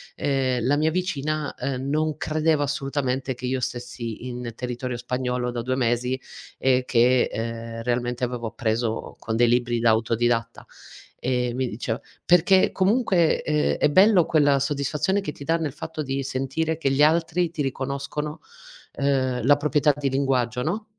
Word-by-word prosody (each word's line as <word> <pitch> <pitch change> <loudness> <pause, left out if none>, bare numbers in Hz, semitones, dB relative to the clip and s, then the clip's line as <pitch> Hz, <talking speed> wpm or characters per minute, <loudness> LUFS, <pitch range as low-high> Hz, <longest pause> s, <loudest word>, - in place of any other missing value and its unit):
ehm, 130 -4 0
la 140 +3 +3
mia 155 +2 +2
vicina, 155 -4 -2
ehm, 130 +1 -3
non 155 +1 0
credeva 155 -1 +1
assolutamente 135 -2 -2
che 125 - -7
io 130 +1 -1
stessi 120 -1 -5
in 125 -1 -5
territorio 125 0 -4
spagnolo 125 0 -2
da 120 -1 -3
2 130 +2 -1
mesi 125 +1 0 0.4
e 130 -1 +2
che, 125 +1 +3
ehm, 115 0 -5
realmente 120 0 -1
avevo 120 -2 -2
appreso 115 0 -2
con 110 - -3
dei 120 +1 +4
libri 120 0 +1
da 115 0 +3
autodidatta, 115 +1 0 0.5
ehm, 125 -1 -1
mi 130 -1 0
diceva 115 +2 -3 0.3
perché 180 +2 +5
comunque, 190 -4 +2
ehm, 150 -1 +1
è - - +3
bello 190 +1 +5
quella 145 -3 +3
soddisfazione 145 +8 0
che 170 - -4
ti 140 - -10
dà 165 +3 +1
nel 155 -5 -3
fatto 160 -1 -6
di 135 0 -2
sentire 135 +5 -2
che 140 -4 0
gli 135 +2 +2
altri 165 +2 +2
ti 155 - -4
riconoscono, 140 +3 -3 0.5
ehm, 130 -3 0
la 145 +1 +6
proprietà 150 0 +2
di 140 -2 -1
linguaggio, 125 -2 0
no? 210 +7 -2
135 Hz, 160 wpm, -24 LUFS, 125-150 Hz, 0.5 s, la